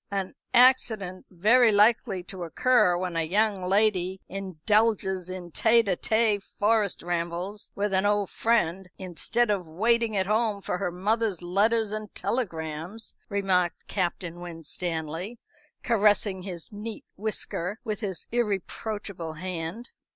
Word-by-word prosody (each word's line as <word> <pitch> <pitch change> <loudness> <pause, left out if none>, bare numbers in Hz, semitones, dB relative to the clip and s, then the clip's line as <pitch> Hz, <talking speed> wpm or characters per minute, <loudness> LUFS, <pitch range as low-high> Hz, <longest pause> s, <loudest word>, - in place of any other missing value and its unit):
"An 195 -2 -3 0.2
accident 225 -7 +3
very 220 +6 +4
likely 210 -2 +3
to 185 0 -6
occur 180 +1 +3
when 180 -1 -3
a 165 - +1
young 200 +3 +1
lady 190 -1 +2
indulges 190 0 0
in 180 -2 -7
tête 230 +6 +4
à 190 -3 +1
tête 220 0 +1
forest 210 -1 0
rambles 175 +4 -3
with 205 0 -1
an 190 0 +3
old 205 -2 +1
friend, 190 -5 +1
instead 200 +5 0
of 185 -5 -1
waiting 225 +5 +1
at 190 - +2
home 215 0 +1
for 180 -2 -3
her 195 - -1
mother's 205 0 0
letters 210 +4 +2
and 215 0 -5
telegrams," 175 -2 -3 0.2
remarked 190 -4 0
Captain 175 -2 -3
Winstanley, 165 +3 -5 0.5
caressing 205 -4 +2
his 180 -3 -7
neat 215 +2 -7
whisker 205 -2 -3
with 215 -4 -3
his 195 -5 -4
irreproachable 205 -5 -3
hand. 180 +6 -5
195 Hz, 130 wpm, -27 LUFS, 180-220 Hz, 0.5 s, very